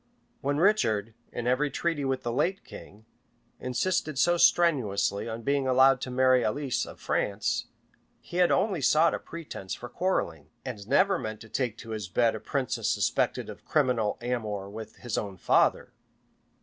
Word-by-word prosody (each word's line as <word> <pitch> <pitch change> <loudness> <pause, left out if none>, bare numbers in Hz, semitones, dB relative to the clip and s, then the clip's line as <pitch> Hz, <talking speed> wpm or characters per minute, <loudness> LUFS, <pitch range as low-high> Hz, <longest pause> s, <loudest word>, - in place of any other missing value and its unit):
When 140 +1 -1
Richard, 115 - +2 0.2
in 120 - -5
every 130 +4 +2
treaty 165 -1 -1
with 135 -1 -1
the 120 - -2
late 185 +10 0
king, 105 +2 -13 0.5
insisted 155 +3 -1
so 175 +5 +4
strenuously 115 - +2
on 115 +1 -6
being 140 0 +1
allowed 130 0 +5
to - - -4
marry 130 0 +3
Alice 135 +4 -1
of - - -11
France, 100 +1 -1 0.5
he 175 - -8
had 180 -1 +5
only 190 -5 +1
sought 155 +5 +4
a - - -2
pretence 150 - -7
for 120 - -9
quarrelling, 85 - -2 0.2
and 105 -6 -6
never 190 - +3
meant 110 -1 -5
to 110 - -12
take 120 -3 -2
to 115 - -9
his 105 -4 -4
bed 115 +5 +2
a 110 - -5
princess 135 +1 -2
suspected - - 0
of - - -9
a - - -31
criminal 125 -8 +1
amour 105 -5 -3
with 110 0 -8
his 120 -3 -3
own 100 -3 -6
father. - - +2
125 Hz, 170 wpm, -28 LUFS, 110-150 Hz, 0.5 s, allowed